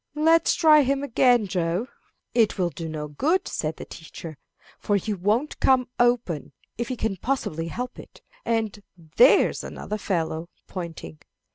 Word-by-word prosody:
"Let's 325 +2 +4
try 310 -3 +6
him 275 +1 0
again, 245 -3 +3
Joe." 180 +3 -1 0.5
"It 225 -3 +3
will 180 -2 0
do 165 -1 -6
no 150 -1 -4
good," 315 - 0
said 155 0 -3
the - - -8
teacher, 160 -2 -10 0.4
"for 205 - 0
he 205 +2 -1
won't 210 +10 0
come 255 -2 +3
open, 240 -10 +1 0.2
if 235 - -3
he 255 - -3
can 220 -5 -2
possibly 165 - -2
help 250 +8 -5
it. - - -14 0.2
And 220 -3 -1 0.4
there's 250 +4 +5
another 210 - -5
fellow 165 -3 -2 0.2
(pointing). 170 -4 -7
215 Hz, 150 wpm, -25 LUFS, 170-255 Hz, 0.5 s, try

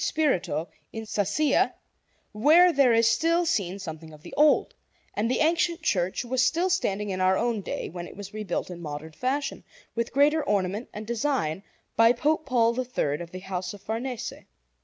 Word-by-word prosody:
Spirito 225 - 0 0.2
in 225 0 -6
Sassia, 210 +9 +1 0.6
where 320 +11 +5
there 275 -4 +5
is 230 0 +4
still 335 +8 +2
seen 195 - 0
something 160 -4 -8
of 155 0 -15
the - - -11
old; 300 0 +4 0.4
and 215 +3 0
the 255 - +1
ancient 335 +1 +1
church 185 - 0
was 255 +1 +1
still 340 +8 +2
standing 210 - 0
in 185 0 -2
our 185 0 +3
own 230 -3 0
day, - - -4
when 175 +1 -7
it - - -13
was 200 -1 -8
rebuilt 210 -4 -3
in 175 -1 -8
modern 155 0 -6
fashion, 275 - -2 0.3
with 235 0 -2
greater 295 +3 +3
ornament 200 +3 -1
and 210 +1 -7
design, 230 - -1 0.3
by 230 +1 +6
Pope 305 +4 0
Paul 235 -3 +3
III 175 - -1
of 170 - -7
the 185 +1 -8
house 185 0 -4
of 200 - -14
Farnese. 235 +2 -4
225 Hz, 180 wpm, -26 LUFS, 185-280 Hz, 0.6 s, by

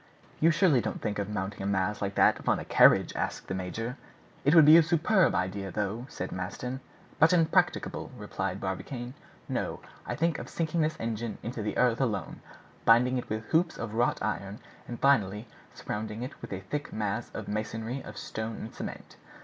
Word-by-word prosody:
"You 165 - +5
surely 165 -6 +4
don't - - -3
think 105 -2 -2
of 100 0 -2
mounting 100 -1 -4
a 95 - -2
mass 100 +1 0
like 100 0 -2
that - - +4
upon - - +1
a - - -6
carriage?" - - +5
asked - - -3
the - - -3
major. 115 +7 -4 0.5
"It 145 +4 +4
would 160 -3 +9
be 155 +2 +9
a 170 - +9
superb 170 +4 +3
idea, 95 +1 -2
though," 105 +5 -3
said 90 - -5
Maston. 115 +8 -4 0.4
"But 160 +3 +6
impracticable," 165 -3 +2
replied - - -3
Barbicane. 125 -2 -4 0.3
"No, - - -2 0.3
I - - -2
think 165 0 0
of - - -7
sinking 165 0 -1
this 155 0 0
engine 115 0 -3
in 115 - -3
the 110 -4 -3
earth 125 0 +3
alone, 105 -10 -2 0.4
binding 125 +2 +5
it - - -8
with 110 +1 -3
hoops 165 +1 +2
of 115 -2 -5
wrought 120 +2 +2
iron, 100 -1 -3 0.3
and 120 - -6
finally 110 -6 +2 0.3
surrounding 110 +2 -4
it 130 - -8
with - - -8
a 95 -1 -4
thick 145 +10 -4
mass 110 +2 -2
of 110 - -5
masonry 110 +4 -3
of 105 - -10
stone 110 0 -4
and 110 - -7
cement. - - -8
115 Hz, 190 wpm, -29 LUFS, 105-140 Hz, 0.5 s, would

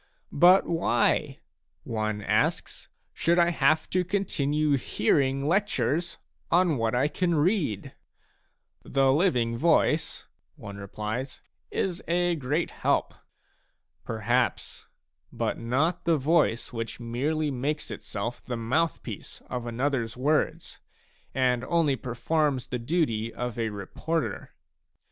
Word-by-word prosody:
But 180 +5 +6
why," 165 -8 +1 0.4
one 110 -2 -2
asks/* - - 0
" - - -46
should 170 +2 +1
I 175 0 +4
have 155 0 +2
to 185 0 +2
continue 155 -6 0
hearing 135 +1 +1
lectures 170 - 0 0.3
on 175 -4 +3
what 115 0 0
I 130 +4 +3
can 175 +2 0
read? 150 - 0 0.3
" - - -41
" - - -52
The 135 -1 +2
living 125 -9 +2
voice," 160 +1 +2 0.3
one 100 0 -9
replies, 110 +6 -5
" - - -46
is 180 -3 -4
a 175 0 +2
great 150 +3 -1
help." - - 0 0.9
Perhaps, 115 +3 -1 0.4
but - - -2
not 135 +11 0
the 165 -2 +3
voice 145 -5 +1
which 115 0 -5
merely 145 +6 -1
makes 145 +4 -2
itself 110 +3 -5
the 120 -2 -4
mouth 140 +8 0
piece - - -7
of 125 -1 -3
anothers 120 -1 -1
words, 150 +4 0 0.6
and 125 -2 +2
only 165 -4 +2
performs 130 +2 -1
the 125 - -4
duty 115 -5 0
of 120 -1 -4
a 115 -1 0
reporter. 110 - -4
135 Hz, 125 wpm, -27 LUFS, 115-165 Hz, 0.9 s, But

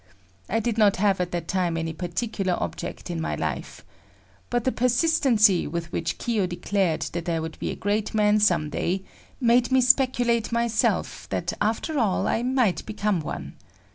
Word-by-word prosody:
I 225 - +1
did 225 0 -1
not 205 -2 +5
have 195 -1 +2
at 180 - -1
that 175 -1 -4
time 180 -3 0
any 165 0 -3
particular 185 +2 -2
object - - -5
in 165 -1 -3
my - - -2
life. - - -5 0.6
But 240 -1 0
the 260 - +1
persistency 245 - +3
with 170 +2 -4
which - - -2
Kiyo 220 -6 0
declared 175 -1 -1
that 170 +1 -3
I 165 -1 0
would 160 0 -6
be - - -2
a - - -3
great 205 +1 -1
man 210 0 +4
some 170 -7 +2
day, 190 +2 -1 0.4
made 245 0 +3
me 260 - +5
speculate 245 -3 +3
myself 235 -1 0
that - - -2
after 230 +8 0
all 210 -6 +1
I 225 - +1
might 250 -6 +1
become 210 -3 0
one. 155 - -6
210 Hz, 170 wpm, -25 LUFS, 175-235 Hz, 0.6 s, not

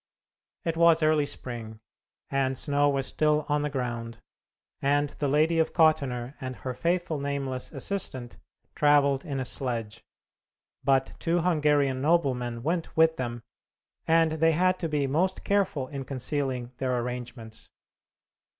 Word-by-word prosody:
It 165 -1 -2
was 165 -1 +5
early 155 -2 +3
spring, 115 -6 -7 0.5
and 135 -1 0
snow 145 +1 +2
was 135 -1 0
still 150 +1 +1
on 150 0 +1
the 150 - -1
ground, 120 -4 -4 0.6
and 145 +1 +2
the 145 - -3
Lady 155 +4 +3
of 160 - +1
Kottenner 140 -7 +2
and 130 -1 -4
her 130 0 -5
faithful 170 +1 -1
nameless 140 -2 -3
assistant 130 - -4 0.4
travelled 140 -2 +3
in 140 -5 -4
a 130 - -2
sledge; 115 -4 -3 0.8
but 135 -1 +2
two 170 +1 +1
Hungarian 150 -6 +2
noblemen 130 -7 +1
went 165 +2 -2
with 160 0 +5
them, 120 -2 -4 0.6
and 165 0 +4
they 160 +1 +3
had 185 +3 +2
to 165 - -2
be 150 -2 0
most 170 +8 0
careful 190 -10 0
in 140 -2 -5
concealing 130 -2 -3
their 130 -2 0
arrangements. 120 -2 -7
140 Hz, 140 wpm, -27 LUFS, 125-160 Hz, 0.8 s, was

